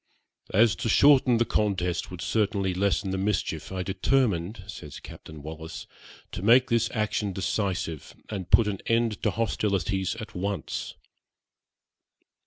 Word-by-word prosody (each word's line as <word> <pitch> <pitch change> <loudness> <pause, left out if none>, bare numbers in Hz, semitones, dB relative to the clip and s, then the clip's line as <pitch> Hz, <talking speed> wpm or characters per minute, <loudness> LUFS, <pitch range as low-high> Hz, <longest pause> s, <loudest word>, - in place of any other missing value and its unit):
'As 110 +2 +4
to 120 -2 -2
shorten 130 -2 +5
the 120 - +2
contest 95 -6 0
would 90 -3 -8
certainly 100 0 0
lessen 100 +1 0
the 95 - -2
mischief, 100 -1 -2
I 95 -1 -2
determined,' 95 -1 0
says 75 -7 -9
Captain 75 -2 -11
Wallis, 80 +1 -7 0.5
'to - - -5
make 125 +5 +5
this 115 -1 +2
action 105 -2 -1
decisive, 95 -5 -2
and 95 -4 -5
put 115 - +6
an 100 -2 -2
end 115 -2 +1
to 105 - +2
hostilities 100 -3 -1
at 110 -1 -8
once.' 100 +1 -4
100 Hz, 135 wpm, -27 LUFS, 90-110 Hz, 0.5 s, put